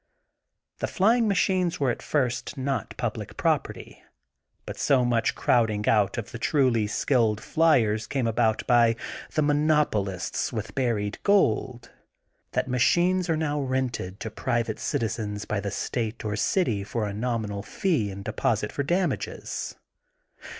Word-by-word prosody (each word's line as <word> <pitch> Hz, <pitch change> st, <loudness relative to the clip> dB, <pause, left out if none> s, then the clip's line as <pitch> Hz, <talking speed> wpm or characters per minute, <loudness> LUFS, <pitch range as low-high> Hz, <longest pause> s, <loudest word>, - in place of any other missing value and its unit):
The -, -, -1 dB
flying 225 Hz, +4 st, +3 dB
machines 185 Hz, -3 st, +1 dB
were 135 Hz, -3 st, +2 dB
at -, -, -5 dB
first 130 Hz, -1 st, -1 dB
not 130 Hz, -4 st, -3 dB
public -, -, -4 dB
property. -, -, -2 dB, 0.6 s
But -, -, -7 dB
so 130 Hz, -3 st, +3 dB
much 115 Hz, -2 st, +1 dB
crowding 110 Hz, -3 st, +1 dB
out 105 Hz, -2 st, +3 dB
of 115 Hz, -, -5 dB
the 115 Hz, -, -7 dB
truly 125 Hz, -6 st, +2 dB
skilled 110 Hz, -1 st, +1 dB
flyers 115 Hz, -11 st, +2 dB
came 135 Hz, -3 st, -1 dB
about 115 Hz, -1 st, +1 dB
by 120 Hz, -2 st, +4 dB, 0.4 s
the 155 Hz, -, +3 dB
monopolists 145 Hz, -, +1 dB
with -, -, -5 dB
buried 110 Hz, -6 st, -1 dB
gold, 125 Hz, -, +1 dB, 0.6 s
that -, -, 0 dB
ma 125 Hz, 0 st, -1 dB
chines 180 Hz, +6 st, +3 dB
are 160 Hz, -, +2 dB
now 150 Hz, -2 st, -1 dB
rented 130 Hz, -8 st, -2 dB
to 110 Hz, -, -4 dB
private 115 Hz, 0 st, -1 dB
citizens 105 Hz, -2 st, -2 dB
by 105 Hz, -, -1 dB
the 100 Hz, 0 st, -3 dB
state 115 Hz, +1 st, -3 dB
or 105 Hz, -1 st, -1 dB
city 110 Hz, -, +1 dB
for 105 Hz, +2 st, -2 dB
a 100 Hz, -, -4 dB
nominal 110 Hz, -2 st, -2 dB
fee 145 Hz, -, 0 dB
and 100 Hz, 0 st, -8 dB
deposit' 110 Hz, -1 st, 0 dB
for -, -, -2 dB
damages. 175 Hz, +6 st, -2 dB
120 Hz, 145 wpm, -26 LUFS, 105-145 Hz, 0.6 s, by